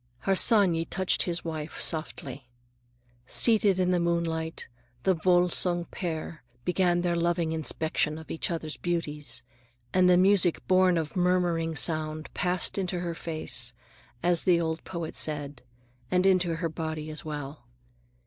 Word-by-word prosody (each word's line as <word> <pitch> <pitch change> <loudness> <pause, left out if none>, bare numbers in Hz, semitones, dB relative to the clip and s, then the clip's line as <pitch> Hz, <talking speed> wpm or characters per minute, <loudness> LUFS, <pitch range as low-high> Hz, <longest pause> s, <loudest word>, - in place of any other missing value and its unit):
Harsanyi 195 -4 +4
touched 185 -1 +1
his 175 -1 -2
wife's 160 0 -1
arm 160 - -1
softly. 135 -4 -10 0.8
Seated 210 - +4
in 180 0 +2
the 180 - +2
moonlight, 165 -1 -2 0.4
the 190 - +3
Volsung 175 0 +2
pair 160 -4 -5 0.2
began 180 -1 +2
their 175 -1 0
loving 170 -1 0
inspection 160 -1 -1
of 160 - -10
each 165 - -2
other's 160 -3 -4
beauties, 155 -4 -3 0.5
and 185 -1 +4
the 180 - +6
music 185 -2 +3
born 185 -1 +4
of 160 -2 -3
murmuring 175 -3 +1
sound 155 0 -1
passed 180 +2 0
into 180 -2 -2
her 170 -1 -3
face, 125 -8 -2 0.5
as 175 -1 +3
the 175 -2 +4
old 160 -1 -2
poet 170 -3 -5
said,—and 125 +1 -2
into 180 -3 +3
her 165 +1 -2
body 155 -1 -5
as 155 - -7
well. 145 -4 -7
170 Hz, 140 wpm, -27 LUFS, 155-180 Hz, 0.8 s, the